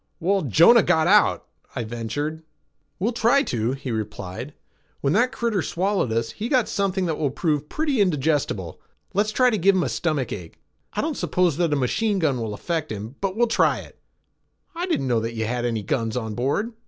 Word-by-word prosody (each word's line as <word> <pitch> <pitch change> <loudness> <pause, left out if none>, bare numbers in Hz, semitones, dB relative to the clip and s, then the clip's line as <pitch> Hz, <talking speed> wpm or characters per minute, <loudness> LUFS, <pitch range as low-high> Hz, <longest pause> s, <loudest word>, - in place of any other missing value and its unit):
"Well, 195 +3 +1
Jonah 165 - +6
got 160 -4 +2
out," 205 +4 +4 0.3
I 120 - -2
ventured. 120 +8 -4 0.6
"We'll 210 +6 0
try 245 +4 +3
to," 120 - -1
he 135 -2 -5
replied. 110 +4 -5 0.5
"When 140 +1 +1
that 245 +5 +3
critter 230 -5 -1
swallowed 185 - 0
us, 115 0 -1
he 225 +3 -5
got 255 -5 +3
something 195 -2 0
that 160 -3 -2
will 150 -3 +1
prove 150 +1 -1
pretty 295 -7 0
indigestible. 145 - 0 0.3
Let's 210 +2 +1
try 250 +2 +3
to 215 - 0
give 195 +3 +4
him 185 - +2
a - - -1
stomach 150 -7 -1
ache. 85 -4 -9 0.3
I - - -1
don't - - -2
suppose 180 -5 +1
that 170 -3 +1
a - - +3
machine 200 - 0
gun 145 -9 +1
will 110 -2 -3
affect 160 +3 -3
him, 110 +3 -6
but 195 -1 -1
we'll 240 +2 +3
try 230 - +2
it." - - -16 0.7
"I 345 +2 -3
didn't 330 - 0
know 120 -2 +2
that 115 +1 -4
you 110 0 -1
had 120 +2 -2
any 115 -3 -1
guns 115 +3 -1
on 110 -3 -3
board." 140 - -1
155 Hz, 200 wpm, -23 LUFS, -, 0.7 s, Jonah